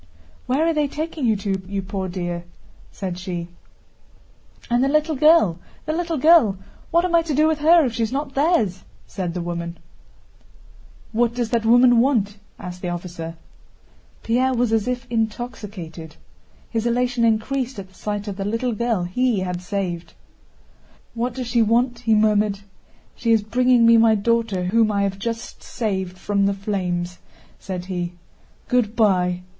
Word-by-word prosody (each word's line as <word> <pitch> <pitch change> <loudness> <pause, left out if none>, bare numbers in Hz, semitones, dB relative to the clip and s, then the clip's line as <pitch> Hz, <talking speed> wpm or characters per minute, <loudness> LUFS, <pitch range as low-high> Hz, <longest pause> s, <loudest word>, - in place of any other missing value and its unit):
"Where 270 +6 +2
are 330 - +2
they 300 -2 +1
taking 305 -2 -3
you 220 - +3
to, 195 -1 -2
you 195 0 -3
poor 190 -1 -4
dear?" 175 -1 -4 0.5
said 185 -2 -5
she. 175 -2 -5 1.2
"And 240 +1 +2
the - - +3
little 305 +2 +1
girl, 290 - +4 0.3
the 310 - -1
little 335 -1 -1
girl, 295 - +5 0.3
what 340 +2 +3
am 360 - -2
I 335 - +6
to 320 -3 -3
do 305 +2 +4
with 315 -1 0
her 325 +1 +6
if 240 - -2
she's 225 0 -1
not 275 +1 -3
theirs?" 270 - +1 0.2
said 180 -3 -4
the 175 - -2
woman. 170 0 -4 1.3
"What 235 +1 +1
does 240 -2 -2
that 230 -2 +1
woman 245 0 +6
want?" 225 -6 +1 0.2
asked 180 0 -8
the 180 - -3
officer. 170 -1 -6 0.9
Pierre 255 +3 +1
was 240 -2 +1
as 220 0 +1
if 250 0 -2
intoxicated. 210 -8 -4 0.6
His 230 0 -1
elation 245 0 +1
increased 235 +3 0
at 190 -1 -8
the - - -24
sight 205 +2 -4
of 200 -2 -5
the 195 - -3
little 230 +4 -1
girl 230 -4 0
he 220 +3 0
had 180 -1 -3
saved. 180 -3 -4 1.0
"What 235 +1 -2
does 255 -1 -4
she 235 0 +1
want?" 235 +2 +2
he 225 -2 +2
murmured. 210 -1 +2 0.5
"She 230 - 0
is 220 -2 +4
bringing 245 +2 +3
me 230 0 +7
my 225 -1 +5
daughter 225 -3 0
whom 215 +4 +2
I 200 -1 +1
have 195 0 -2
just 230 +2 -5
saved 190 -6 -3
from 200 +2 0
the 200 - 0
flames," 180 -3 -3 0.4
said 180 -2 -5
he. 175 -2 -3 0.5
"Good 235 -3 +1
by!" 180 -5 +2
220 Hz, 165 wpm, -22 LUFS, 190-250 Hz, 1.3 s, me